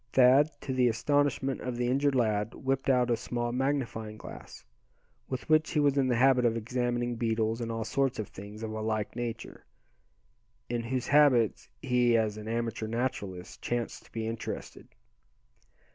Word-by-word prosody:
Thad, 130 +4 +6
to 130 - -3
the 125 -1 +3
astonishment 135 +3 +1
of 125 -2 -4
the 120 - 0
injured 135 +3 +2
lad, 110 -3 +1
whipped 135 0 -1
out 125 -2 +3
a - - +4
small 120 +1 -3
magnifying 125 -5 -2
glass, - - -11 0.6
with 130 -1 -4
which 155 0 +3
he 150 - +2
was 145 -2 +3
in 135 -2 +2
the 125 - +2
habit 130 +1 +4
of 115 -1 +2
examining 120 +1 -1
beetles, 115 0 0
and 115 -1 -3
all 115 0 -2
sorts 135 +4 0
of 110 - -4
things 105 +3 -9
of 110 - -4
a 110 0 -4
like 110 -1 -2
nature, 120 -2 -5 1.1
in 120 0 -1
whose 125 +1 -2
habits 140 -7 +4
he, 125 -2 +3
as 110 -2 0
an 105 0 -8
amateur 115 -1 -2
naturalist, 110 -6 -4
chanced 120 -1 -3
to - - -21
be 115 -1 -3
interested. 115 0 -6
120 Hz, 170 wpm, -29 LUFS, 110-130 Hz, 1.1 s, Thad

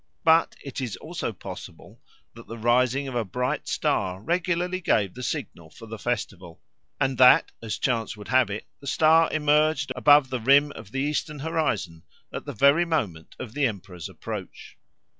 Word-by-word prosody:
But 165 0 +4
it 140 0 -5
is 115 -7 -4
also 155 - -5
possible 100 - -11 0.3
that 115 0 -14
the 115 - -8
rising 125 +4 +2
of 130 - -6
a 120 -1 0
bright 125 +8 -3
star 95 -1 -1
regularly 175 - -1
gave 100 - +1
the 125 - -9
signal 85 -8 -5
for 115 - -13
the 110 0 -8
festival, 95 -8 -4 0.4
and 135 -2 0
that 125 -1 +6
as 115 -2 -4
chance 115 -4 -1
would 105 - -11
have 130 -4 +3
it 105 +2 -5
the 140 - -12
star 160 +4 +4
emerged 150 -2 +2
above 145 +1 +5
the 130 - -1
rim 140 +5 +4
of 100 - -11
the 135 - -2
eastern 150 +1 -2
horizon 140 - -2 0.3
at - - -6
the - - -5
very 140 +5 +4
moment 105 - -3
of 115 - -8
the 145 -1 +2
emperor's 90 -6 -7
approach. - - -8
130 Hz, 175 wpm, -25 LUFS, 110-150 Hz, 0.4 s, that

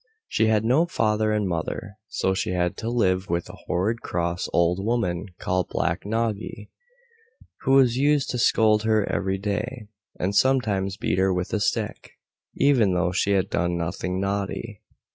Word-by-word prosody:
She 110 - +1
had 110 0 +2
no 140 +9 +3
father 110 -7 +1
and 105 -2 0
mother, 95 +4 -4
so 95 - 0
she 95 -1 -2
had 90 -1 0
to 115 - -3
live 95 -6 +1
with 85 0 -1
a - - -9
horrid 105 +6 0
cross 85 0 -2
old 85 +2 +2
woman 105 -5 -1
called 90 -1 -1
Black 85 +4 -1
Noggy, 110 -1 -3 0.9
who 135 0 +4
used 135 +4 +2
to 125 - -2
scold 110 -2 +4
her 110 -1 +2
every 95 0 -1
day, 105 +3 -4 0.3
and 95 +3 -1
sometimes 105 -6 +2
beat - - -1
her 95 0 +3
with 90 0 -2
a 110 - +1
stick, - - -2 0.4
even 120 -10 +3
though 90 0 +1
she 95 +2 +1
had 95 -2 +1
done 85 -1 0
nothing 90 +2 -3
naughty. 100 +2 -3
100 Hz, 160 wpm, -24 LUFS, 90-115 Hz, 0.9 s, who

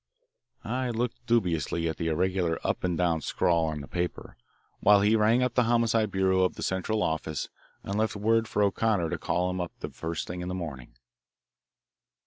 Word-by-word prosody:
I 130 0 -2
looked 120 +1 -2
dubiously 85 - +1
at 80 - -3
the 80 - -2
irregular 90 +1 0
up - - -1
and 90 -2 0
down 85 -2 +1
scrawl 85 +2 +1
on 75 -2 -3
the 70 - -9
paper, 90 0 -4 0.4
while 100 0 +6
he 105 +2 +4
rang 110 +3 +4
up 125 -1 0
the 125 -1 +3
Homicide 115 -2 +2
Bureau 95 -1 +2
of 90 - +1
the - - -6
Central 100 +3 -1
Office 80 -1 -2 0.3
and 100 +2 -2
left 110 0 0
word 110 +2 +2
for 105 - +1
O'Connor 100 -4 +1
to - - -2
call 90 +1 0
him 90 0 -2
up 90 - -5
the - - -6
first 80 0 -4
thing 90 0 -5
in 90 - -4
the 90 - -3
morning. 70 -9 -7
95 Hz, 190 wpm, -28 LUFS, 85-110 Hz, 0.4 s, while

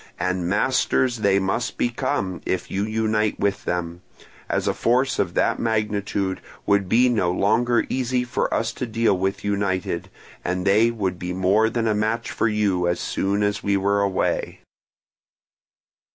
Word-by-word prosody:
And 90 -1 -1
masters 125 +3 +1
they 100 -3 +2
must 100 +5 -1
become, 95 -6 -1
if 90 -1 -3
you 100 +1 -1
unite 110 -1 0
with 100 0 -1
them; 90 0 -3 0.5
as - - 0
a - - +2
force 125 +3 +1
of 85 -3 -1
that - - +1
magnitude 105 -3 -1 0.2
would 100 -2 +2
be 120 +4 +5
no 105 -8 +1
longer 115 +6 +2
easy 125 -1 0
for 125 +1 -2
us 115 0 0
to 125 - -4
deal 115 -2 +2
with 95 +1 -2
united, 100 -3 -1 0.3
and 90 +1 -2
they 105 +4 +4
would 95 -6 -3
be 90 0 -4
more 95 +5 +3
than 115 0 -1
a 110 - +2
match 110 +2 -1
for - - 0
you 100 -5 +1
as 85 - 0
soon 100 +2 -1
as 105 -1 0
we 100 0 +1
were 100 +1 +1
away. 100 -2 -1
100 Hz, 160 wpm, -23 LUFS, 95-115 Hz, 0.5 s, be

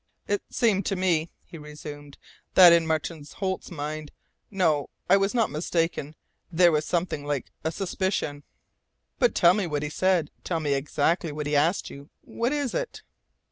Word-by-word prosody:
"It 205 0 0
seemed 215 -6 +2
to 195 - 0
me," 175 -3 +1 0.2
he 165 - -11
resumed, 150 -1 -10 0.4
"that 180 -2 +10
in 165 -1 +3
Martin 160 0 -2
Holt's 190 -1 -3
mind 155 -2 -5 0.4
no, 160 -7 +1 0.2
I - - +6
was 195 +3 +1
not 230 -2 +2
mistaken 160 -1 -1 0.4
there 175 0 +5
was 150 -1 +1
something 165 -4 -1
like 145 -3 -3
a 160 - 0
suspicion." 185 -5 -2 0.8
"But 245 -2 +3
tell 175 0 +6
me 200 -2 -1
what 150 -2 -2
he 150 - -3
said! 185 -3 +1
Tell 170 -3 -1
me 145 -3 0
exactly 150 +4 0
what 150 0 -4
he 145 0 0
asked 160 +6 +1
you. 140 +1 -11
What 235 +2 -2
is 290 -4 -1
it?" - - -4
165 Hz, 170 wpm, -26 LUFS, 150-190 Hz, 0.8 s, that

